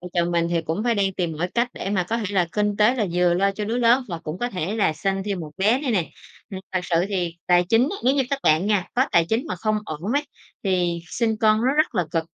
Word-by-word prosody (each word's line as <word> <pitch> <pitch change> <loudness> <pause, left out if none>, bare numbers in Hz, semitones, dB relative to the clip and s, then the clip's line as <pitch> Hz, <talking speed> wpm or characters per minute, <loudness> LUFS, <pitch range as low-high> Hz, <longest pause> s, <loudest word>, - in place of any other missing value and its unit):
Vợ 180 - -8
chồng 175 0 +1
mình 170 0 +1
thì 170 -1 +1
cũng 165 +7 -3
phải 235 -1 +2
đang 195 -1 +1
tìm 175 -3 -2
mọi 170 +4 -2
cách 240 +1 +2
để 195 - -5
mà 190 -3 +1
có 230 - 0
thể 225 - -3
là 180 -3 +3
kinh 210 -1 0
tế 215 +4 +4
là 220 -5 0
vừa 175 0 +3
lo 195 +2 +2
cho 210 +1 -4
đứa 225 +3 -2
lớn 245 +2 +3
và 170 - -4
cũng 165 +1 -6
có 245 - -1
thể 185 +1 -3
là 195 -7 +2
sanh 195 +4 -2
thêm 200 -3 -3
một 155 -2 -7
bé 215 +7 +2
nữa 290 - -4
nè. 180 -6 0 0.4
Ừm, 190 -2 -6
thực 185 - +1
sự 170 -1 0
thì 175 -4 -2
tài 175 0 +4
chính 225 +3 +4
á, 400 - -4
nếu 260 +2 +4
như 280 - +2
các 280 - 0
bạn 155 +5 +3
nha 205 -4 +2
có 255 +2 +3
tài 170 -1 +5
chính 225 +3 0
mà 185 - -4
không 215 +4 0
ổn 165 +5 -4
ấy, 290 +1 0 0.4
thì 175 -3 0
sinh 220 +4 -1
con 215 0 +4
nó 260 - +3
rất 310 -5 +2
là 180 - +1
cực, 165 -1 -1
195 Hz, 290 wpm, -23 LUFS, 175-225 Hz, 0.4 s, tài